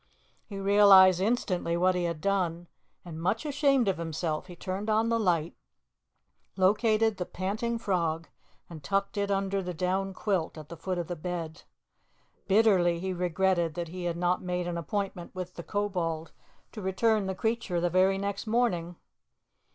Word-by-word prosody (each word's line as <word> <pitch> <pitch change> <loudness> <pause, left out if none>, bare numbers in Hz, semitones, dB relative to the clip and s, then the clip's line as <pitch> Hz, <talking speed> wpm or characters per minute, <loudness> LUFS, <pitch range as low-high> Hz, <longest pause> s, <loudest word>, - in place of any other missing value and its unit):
He 200 - -7
realized 195 -2 +7
instantly 185 -6 0
what 185 +1 +3
he 180 -1 -1
had 170 -2 -3
done, 175 -3 0 0.4
and 165 -2 -7
much 210 - 0
ashamed 275 -4 +2
of 185 -3 0
himself, 160 0 -3
he 180 - -10
turned 190 +4 -4
on 220 +1 +2
the 230 0 +1
light, 170 -6 +1 1.0
located 215 +2 +3
the 180 - -3
panting 215 +5 -2
frog, 170 -7 -1 0.4
and 160 -4 -10
tucked 195 +5 -1
it 200 0 -1
under 195 0 0
the 180 -1 -5
down 190 +3 -1
quilt 185 -7 -1
at 155 -1 -10
the 170 - -7
foot 180 +3 -3
of 175 - -2
the 175 - -5
bed. 170 -1 -5 0.9
Bitterly 190 -5 +4
he 190 +1 -3
regretted 175 -1 0
that 170 -2 -4
he 180 +1 -6
had 170 -1 -2
not 180 +1 +1
made 180 -1 -2
an 175 - -3
appointment 180 +1 -4
with 180 -1 -5
the - - -7
Kobold 170 -5 -2 0.4
to 215 - -8
return 200 +2 +1
the 190 - -2
creature 220 -3 -1
the 175 0 0
very 190 +1 +3
next 200 +2 -4
morning. 185 -7 0
185 Hz, 165 wpm, -28 LUFS, 170-200 Hz, 1.0 s, realized